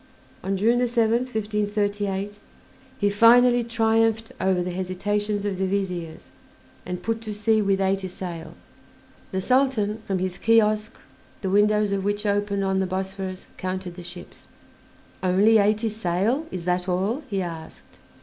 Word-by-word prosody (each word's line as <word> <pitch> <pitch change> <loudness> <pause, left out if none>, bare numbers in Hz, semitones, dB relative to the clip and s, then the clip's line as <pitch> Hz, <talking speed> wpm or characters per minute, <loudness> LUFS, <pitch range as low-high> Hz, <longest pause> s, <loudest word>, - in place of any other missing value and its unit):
On 195 0 -1
June 230 +5 +3
7th, 240 0 +1
1538, 205 -1 -1 0.6
he 205 -4 +2
finally 240 +3 +6
triumphed 225 -1 +1
over 185 -2 +2
the 180 - -3
hesitations 205 +3 -2
of 195 -2 -2
the 190 - +1
Viziers 180 -4 -3 0.6
and 180 0 -5
put 225 0 -1
to 220 -2 -6
sea 215 +1 +2
with 195 -1 +1
eighty 195 0 0
sail. 175 -3 -7 0.8
The 190 - -1
Sultan, 235 -3 +1
from 195 - 0
his 185 -1 -3
kiosk, 215 -1 +2 0.5
the 190 - -2
windows 210 +1 +3
of 195 -1 -1
which 205 +1 -1
opened 205 -1 0
on 190 0 +1
the 190 - 0
Bosphorus, 190 0 -4
counted 185 -1 -4
the 180 - -10
ships. 175 +1 -10 0.7
"Only 200 +4 +4
eighty 215 +2 +2
sail; 220 - -1
is 180 -2 -6
that 180 +1 0
all?" 195 +10 0
he 195 -3 -1
asked. 165 -2 -9
205 Hz, 145 wpm, -24 LUFS, 185-220 Hz, 0.8 s, finally